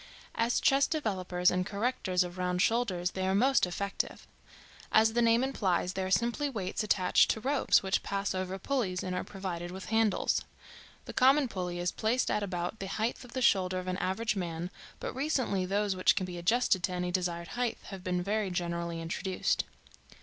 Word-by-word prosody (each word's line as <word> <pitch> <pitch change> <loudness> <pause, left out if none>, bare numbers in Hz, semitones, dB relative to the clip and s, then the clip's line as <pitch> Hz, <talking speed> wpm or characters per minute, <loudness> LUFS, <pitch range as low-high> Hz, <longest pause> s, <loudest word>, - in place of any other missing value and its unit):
As 230 +1 +1
chest 275 +1 +3
developers 185 - +1
and 180 0 +1
correctors 200 -3 0
of 180 +1 -8
round 180 0 0
shoulders 190 -5 +1
they 190 0 -2
are 190 - +2
most 255 -1 +4
effective. 195 +3 -3 0.7
As 220 0 +5
the 240 - +2
name 230 +1 +4
implies, 190 -9 0
they 190 - -2
are 185 - -2
simply 235 +8 +1
weights 195 -8 -3
attached 195 -4 +3
to - - +1
ropes, 270 0 +3
which 190 +1 +1
pass 200 0 -2
over 185 0 -3
pulleys, 195 -5 -1
and 185 -1 -3
are - - -2
provided 180 -3 -5
with 190 +1 -8
handles. 220 -3 +2 0.6
The - - -7
common 270 +2 +5
pulley 180 -5 -4
is 175 0 -1
placed 230 +3 0
at 210 - +1
about 180 +1 -3
the 195 - -4
height 225 +6 -2
of 245 - -13
the 260 - -1
shoulder 185 -4 +3
of 185 - -4
an 185 0 -1
average 215 +5 -1
man, 175 -1 -4 0.3
but - - -4
recently 260 -9 0
those 200 0 0
which 185 - +4
can 185 - -1
be 180 -1 -6
adjusted 195 +1 +2
to 190 - -5
any 180 0 -2
desired 175 -2 -2
height 245 -1 -1
have 195 -2 -8
been 180 -1 -1
very 205 +1 0
generally 170 -1 -2
introduced. 175 +3 -1
190 Hz, 190 wpm, -30 LUFS, 180-230 Hz, 0.7 s, As